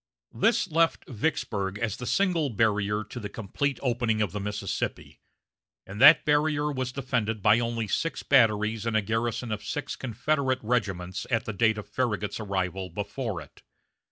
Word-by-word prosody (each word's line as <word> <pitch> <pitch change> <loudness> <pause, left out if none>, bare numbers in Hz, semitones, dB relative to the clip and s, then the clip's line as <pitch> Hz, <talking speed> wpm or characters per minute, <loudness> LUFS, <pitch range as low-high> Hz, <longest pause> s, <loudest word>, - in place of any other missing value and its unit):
This 225 -3 +2
left 165 0 +1
Vicksburg 105 -6 -2
as 115 -2 -2
the 125 - -6
single 165 - +1
barrier 105 -1 +1
to - - -8
the 105 - -5
complete 120 +6 -2
opening 120 -3 +1
of 105 -5 0
the 105 - -4
Mississippi, 100 -1 -4 0.7
and 100 +4 -7
that 150 +4 +9
barrier 150 0 +2
was 130 -2 -3
defended 120 -6 -2
by 105 +2 +5
only 115 -2 -2
six 165 +11 -2
batteries 110 -3 +3
and 110 -1 +2
a 110 - +1
garrison 115 +2 -2
of 105 -1 -3
six 145 +7 -4
Confederate 130 +2 0
regiments 95 -6 -2
at 115 -4 0
the 110 - -4
date 110 +2 +2
of 105 - -7
Farragut's 105 -6 -2
arrival 95 -2 -2
before 105 +1 -4
it. 75 - -15
115 Hz, 160 wpm, -27 LUFS, 105-130 Hz, 0.7 s, that